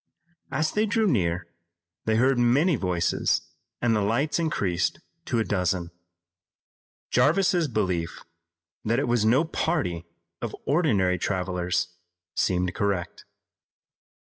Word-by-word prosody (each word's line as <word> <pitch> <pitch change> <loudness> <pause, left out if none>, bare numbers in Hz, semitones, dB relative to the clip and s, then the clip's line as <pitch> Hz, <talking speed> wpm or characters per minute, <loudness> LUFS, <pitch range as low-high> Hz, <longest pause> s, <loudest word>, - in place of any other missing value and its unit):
As 155 +3 0
they 215 +1 +1
drew 220 +1 +2
near, 90 - +1 0.6
they 110 - +2
heard 130 +2 +3
many 140 +9 +4
voices 90 -6 +1 0.4
and 115 -2 +3
the 105 - +1
lights 135 +10 +1
increased 100 - 0 0.3
to 120 - -1
a 115 - +2
dozen. 90 -4 -1 1.2
Jarvis's 175 +1 +3
belief 95 -8 -2 0.6
that 115 +2 +1
it 140 - 0
was 120 -2 +2
no 130 +9 +4
party 90 - -1 0.3
of - - -4
ordinary 105 - +2
travelers 90 -2 -1 0.5
seemed 90 -1 +1
correct. 100 -4 -2
110 Hz, 115 wpm, -26 LUFS, 90-145 Hz, 1.2 s, many